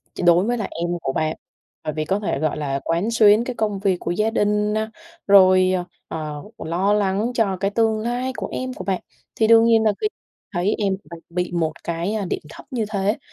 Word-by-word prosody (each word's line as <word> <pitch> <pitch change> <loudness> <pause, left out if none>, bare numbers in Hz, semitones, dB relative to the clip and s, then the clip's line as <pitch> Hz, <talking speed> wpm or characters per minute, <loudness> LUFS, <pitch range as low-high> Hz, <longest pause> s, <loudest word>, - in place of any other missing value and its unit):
Ch - - -4
đối 175 +2 +6
với 240 +1 0
là 215 - -2
em 170 +1 -3
của 135 - -2
bạn, 155 0 0 0.5
bởi 155 - -3
vì 155 0 -2
có 195 +4 0
thể, 195 -9 -2
gọi 155 -1 0
là, 140 -2 -2
quán 175 +8 0
xuyến 215 0 +5
cái 250 0 -5
công 210 -3 -1
việc 190 -2 +1
của 170 - -3
gia 215 +5 +1
đình 210 -1 +1
này, 220 0 0 0.4
rồi, 185 -1 +6 0.3
ờ, 150 -2 -5
lo 185 +5 0
lắng 205 +3 +1
cho 200 -5 +1
cái 195 +2 -1
tương 220 0 +2
lai 245 +3 -2
của - - -3
em 255 0 -3
của - - -7
bạn, 190 -2 -1 0.3
thì 220 - +2
đương 230 0 +7
nhiên 225 -1 +4
là 215 - +4
khi 425 - +2 0.4
thấy 190 +2 0
em 200 -2 +1 0.2
mình 170 - -8
bị 180 0 -2
một 165 -2 0
cái, 170 +5 -2
a, 210 -3 -2
điểm - - -3
thấp - - -12
như 230 -4 -1
thế 205 +1 0
200 Hz, 225 wpm, -22 LUFS, 175-220 Hz, 0.5 s, đương